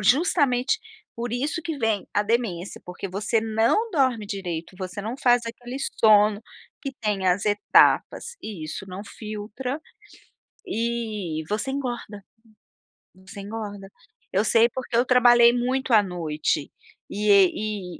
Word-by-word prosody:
Justamente, 265 Hz, -, +2 dB, 0.4 s
por 235 Hz, 0 st, -4 dB
isso 285 Hz, +6 st, -1 dB
que 320 Hz, -2 st, -4 dB
vem 220 Hz, -4 st, 0 dB
a 205 Hz, -, +3 dB
demência. 210 Hz, -5 st, -2 dB
Porque 180 Hz, +2 st, -6 dB
você 205 Hz, +4 st, 0 dB
não 225 Hz, -, +1 dB
dorme 260 Hz, -, +1 dB
direito, 180 Hz, -3 st, -5 dB
você 185 Hz, +1 st, -5 dB
não 230 Hz, +5 st, -4 dB
faz 245 Hz, -2 st, +4 dB
aquele 245 Hz, +2 st, -7 dB, 0.2 s
sono 210 Hz, -1 st, +5 dB, 0.4 s
que 275 Hz, -2 st, -4 dB
tem 205 Hz, -4 st, -1 dB
as 185 Hz, +2 st, +2 dB
etapas 210 Hz, -, +3 dB
e 190 Hz, -8 st, -6 dB
isso 155 Hz, +5 st, -6 dB
não 185 Hz, +2 st, -7 dB
filtra 220 Hz, +6 st, -6 dB, 0.9 s
e 220 Hz, -, -3 dB
você 215 Hz, +5 st, -2 dB
engorda, 240 Hz, -7 st, -5 dB, 0.9 s
você 195 Hz, +2 st, -11 dB
engorda. 205 Hz, -2 st, -7 dB, 0.4 s
Eu 200 Hz, +3 st, +1 dB
sei 230 Hz, +2 st, +4 dB
porque 250 Hz, -1 st, -5 dB
eu 240 Hz, -, +5 dB
trabalhei 240 Hz, -1 st, +6 dB
muito 255 Hz, +1 st, -1 dB
à 215 Hz, -, +7 dB
noite 155 Hz, -6 st, -2 dB, 0.4 s
e 210 Hz, +1 st, -3 dB
e 200 Hz, -1 st, +2 dB
215 Hz, 135 wpm, -24 LUFS, 195-245 Hz, 0.9 s, à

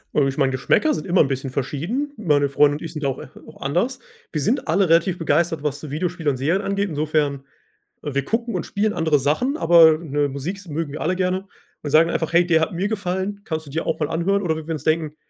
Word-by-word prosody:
Äh, 140 Hz, -2 st, +3 dB
ich 135 Hz, -, -3 dB
meine, 135 Hz, -2 st, +2 dB
Geschmäcker 135 Hz, -, +2 dB
sind 200 Hz, -, -5 dB
immer 180 Hz, +1 st, +4 dB
'n 140 Hz, -, +3 dB
bisschen 135 Hz, 0 st, -3 dB
verschieden. 165 Hz, -, -2 dB
Meine 145 Hz, -8 st, +2 dB
Freunde 145 Hz, +1 st, +4 dB
und -, -, -14 dB
ich 165 Hz, -, -6 dB
sind 150 Hz, -2 st, -5 dB
da -, -, +1 dB
auch 130 Hz, -, -4 dB
äh, -, -, -9 dB, 0.2 s
auch -, -, -14 dB
anders. 180 Hz, -, -1 dB, 0.3 s
Wir 150 Hz, -, -2 dB
sind 245 Hz, -, 0 dB
alle 180 Hz, +2 st, +2 dB
relativ 170 Hz, +2 st, +3 dB
begeistert, 160 Hz, -1 st, 0 dB
was 145 Hz, -1 st, -2 dB
so 145 Hz, -1 st, -8 dB
Videospiele 165 Hz, 0 st, -2 dB
und 135 Hz, -, -1 dB
Serien 165 Hz, +9 st, +1 dB
angeht, 200 Hz, 0 st, -1 dB
insofern, 150 Hz, -3 st, -1 dB, 0.6 s
äh, 145 Hz, -3 st, -4 dB
wir 140 Hz, -1 st, -1 dB
gucken 235 Hz, +4 st, -2 dB
und -, -, -2 dB
spielen 210 Hz, +1 st, -1 dB
andere 160 Hz, -4 st, +2 dB
Sachen, 245 Hz, -, 0 dB
aber, 165 Hz, -, +6 dB
ne, 145 Hz, -3 st, -1 dB
Musik 140 Hz, +8 st, -4 dB
s 200 Hz, -2 st, -13 dB
mögen 155 Hz, -1 st, -3 dB
wir 155 Hz, -, -6 dB
alle 180 Hz, +4 st, 0 dB
gerne 185 Hz, +1 st, -1 dB, 0.4 s
und 145 Hz, -, -3 dB
sagen 165 Hz, +2 st, +5 dB
einfach: 160 Hz, 0 st, -2 dB
„Hey, 175 Hz, +1 st, +5 dB
der 160 Hz, -2 st, +3 dB
hat 160 Hz, -, -1 dB
mir 190 Hz, +4 st, -1 dB
gefallen, 200 Hz, -1 st, -3 dB
kannst 160 Hz, -1 st, -4 dB
du -, -, -9 dB
dir 160 Hz, +3 st, -3 dB
auch -, -, -1 dB
mal 150 Hz, -, -1 dB
anhören.“ 195 Hz, +5 st, +1 dB
Oder 160 Hz, -3 st, 0 dB
wenn 160 Hz, 0 st, -8 dB
wir 165 Hz, -, -2 dB
uns 155 Hz, -, -5 dB
denken: 155 Hz, -1 st, 0 dB
160 Hz, 255 wpm, -22 LUFS, 145-185 Hz, 0.6 s, aber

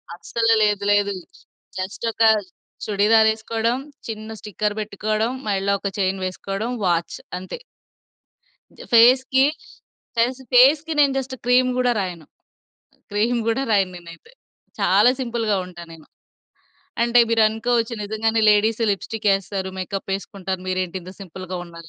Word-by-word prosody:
అస్సలే 225 Hz, +4 st, +1 dB
లేదు. 205 Hz, -1 st, +1 dB
లేదు. 200 Hz, 0 st, +2 dB, 0.6 s
జస్ట్ 190 Hz, +5 st, -5 dB
ఒక 225 Hz, -, -8 dB, 0.6 s
చుడిదార్ 220 Hz, +2 st, +4 dB
ఎసుకోవడం, 225 Hz, +2 st, -2 dB, 0.3 s
చిన్న 220 Hz, 0 st, -6 dB
స్టిక్కర్ 210 Hz, +1 st, -3 dB
బెట్టుకోవడం, 215 Hz, +2 st, -2 dB, 0.2 s
మెడలో 200 Hz, 0 st, +1 dB
ఒక 200 Hz, -, -3 dB
చైన్ 190 Hz, 0 st, 0 dB
వేసుకోవడం, 195 Hz, +5 st, -4 dB
వాచ్ 170 Hz, -1 st, 0 dB, 0.2 s
అంతే. 185 Hz, -, -8 dB, 1.3 s
ఫేస్‌కి, 260 Hz, +3 st, +5 dB, 0.7 s
కనీసం 250 Hz, +3 st, 0 dB
ఫేస్‌‌కి 295 Hz, +6 st, +5 dB
నేను 280 Hz, -2 st, +4 dB
జస్ట్ 260 Hz, 0 st, -6 dB
క్రీమ్ 255 Hz, +1 st, +4 dB
గూడా 250 Hz, -1 st, +2 dB
రాయను. 175 Hz, -4 st, -6 dB, 0.9 s
క్రీమ్ 230 Hz, +4 st, +1 dB
గూడా 230 Hz, +4 st, +1 dB
రాయను 195 Hz, -3 st, +2 dB
నేనైతే. 175 Hz, -, -13 dB, 0.5 s
చాలా 250 Hz, -, +5 dB
సింపుల్‌గా 230 Hz, -4 st, -1 dB
ఉంటా 175 Hz, -1 st, -11 dB
నేను. 160 Hz, -2 st, -14 dB, 1.0 s
అంటే 240 Hz, 0 st, +4 dB
మీరు 225 Hz, -1 st, +4 dB
అనుకోవచ్చు 230 Hz, +1 st, -1 dB
నిజంగానే 220 Hz, +2 st, 0 dB
లేడీస్ 220 Hz, +2 st, +2 dB
లిప్స్టికెస్తారు, 195 Hz, -2 st, -1 dB
మేకప్ 195 Hz, +1 st, -4 dB
ఎసుకుంటారు 190 Hz, -2 st, -6 dB
మీరేంటి 185 Hz, 0 st, -2 dB
ఇంత 185 Hz, +2 st, -10 dB
సింపుల్‌గా 185 Hz, 0 st, -7 dB
ఉన్నారు. 165 Hz, -1 st, -12 dB
215 Hz, 120 wpm, -22 LUFS, 190-235 Hz, 1.3 s, ఫేస్‌కి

